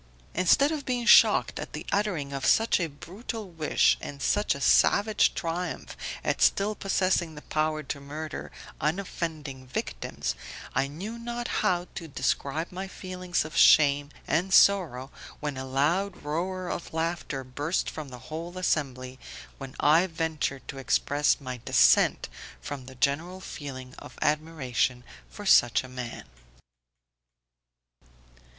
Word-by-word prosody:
Instead 185 - +4
of 305 -3 -3
being 245 -2 -2
shocked - - +6
at - - -7
the - - -6
uttering 180 -9 -1
of 135 -1 -4
such 225 +10 +4
a 170 - 0
brutal 195 - -7
wish, 160 -2 +2
and 140 - -7
such 205 +8 +1
a - - -6
savage 205 +9 +4
triumph 170 +1 -4 0.3
at - - -1
still 205 +2 +3
possessing 185 -5 0
the 150 - -10
power 155 0 -1
to 140 +1 -5
murder 150 +3 -6 0.3
unoffending 155 -5 -3
victims, 65 - -3 0.4
I 135 +1 +1
knew 195 +11 -7
not 240 +1 -4
how 175 -1 +1
to 165 - -6
describe 140 +3 -1
my 190 +2 -5
feelings 185 -3 -3
of 155 - -8
shame 145 -1 +6 0.2
and 180 +4 0
sorrow 165 -11 +4 0.3
when 150 -2 -3
a 130 0 -5
loud 170 +9 0
roar 180 +5 -2
of 175 - -5
laughter 160 -4 -2
burst 145 +7 -2
from 155 -3 -6
the 125 - -9
whole 170 +3 -5
assembly, 130 -7 -1 0.4
when 135 -2 -8
I 160 +5 +5
ventured 160 -5 -3
to 135 - -6
express 145 +2 +2
my 130 -3 -6
dissent - - +4 0.3
from 130 - -7
the 130 - -11
general 160 +8 0
feeling 130 -8 -8
of - - -12
admiration 145 -5 0 0.3
for - - -10
such 120 +1 +5
a - - -9
man. 125 -2 -7
155 Hz, 140 wpm, -27 LUFS, 135-185 Hz, 0.4 s, shocked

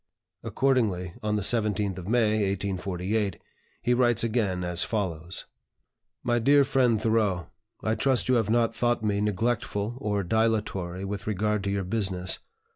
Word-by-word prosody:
Accordingly 105 -10 0
on 105 0 0
the 105 - 0
17th 105 -4 +1
of 90 - -8
May, 110 -1 +2
1848, 100 0 -2 0.4
he 125 - +3
writes 120 -3 +3
again 105 -6 0
as 90 0 0
follows: 90 -6 -3 1.0
"DEAR 140 +4 +5
FRIEND 130 -6 +2
THOREAU, 105 -6 +1 0.4
I 110 - +1
trust 130 +1 +1
you 130 - +3
have 115 -4 +2
not 115 0 +2
thought 120 -1 0
me 100 -1 +1
neglectful 105 +1 -1
or 105 -6 -1
dilatory 100 -3 0
with 100 +1 -5
regard 105 0 0
to - - 0
your 100 -1 -1
business. 95 -2 -1
105 Hz, 140 wpm, -27 LUFS, 95-115 Hz, 1.0 s, DEAR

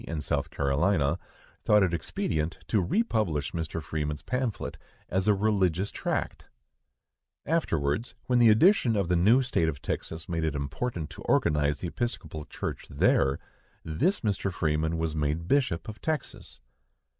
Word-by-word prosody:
in 80 -2 -3
South 75 +2 -1
Carolina" 70 +2 +1 0.4
thought 105 -1 +5
it 90 -3 +1
expedient 80 0 -2
to 105 - +2
republish 90 - 0
Mr. 80 0 -3
Freeman's 75 -1 -3
pamphlet 125 -3 -2 0.3
as 95 +2 0
a 105 - +6
religious 95 -2 +1
tract! - - -3 1.0
Afterwards, 110 - 0
when 125 -1 +2
the 120 -1 +7
addition 120 - +5
of 100 -4 0
the 90 - +3
new 110 +10 +5
State 85 -10 +1
of 70 -3 -5
Texas 80 +4 -4
made 85 -3 -2
it 80 -2 0
important 75 - -3
to - - -10
organize 75 -1 +1
the 90 - -2
Episcopal 80 - -4
Church - - -5
there, 70 0 +3 0.5
this 145 - 0
Mr. 100 -2 -1
Freeman 80 -1 0
was 80 -1 -1
made 75 +2 -1
Bishop 125 -12 +1
of 110 -1 -8
Texas. 155 -2 -4
85 Hz, 145 wpm, -28 LUFS, 75-110 Hz, 1.0 s, the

